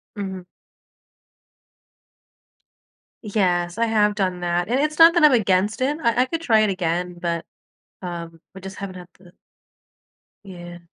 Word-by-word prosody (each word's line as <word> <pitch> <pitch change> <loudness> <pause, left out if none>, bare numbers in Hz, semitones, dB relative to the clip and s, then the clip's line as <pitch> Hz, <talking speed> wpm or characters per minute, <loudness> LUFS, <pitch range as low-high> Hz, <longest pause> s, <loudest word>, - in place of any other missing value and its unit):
Mhm. 190 -3 -6 2.8
Yes, 180 -3 0
I 230 - +2
have 210 -2 +2
done 185 -3 -2
that, 175 +1 -1
and 250 +3 +1
it's 305 +2 -1
not 330 +1 +8
that 340 - +3
I'm 300 - +7
against 205 0 +1
it, 285 +3 0
I 235 +1 +2
I - - -2
could 330 +3 -4
try 225 -8 +3
it 215 - +2
again, 180 -1 -2
but, 170 -1 -3 0.6
um, 170 -2 -7
we 190 - -10
just 190 0 -9
haven't 195 -2 -7
had 180 -1 -11
the 180 -1 -19 1.1
Yeah. 175 -3 -10
190 Hz, 150 wpm, -22 LUFS, 175-225 Hz, 2.8 s, not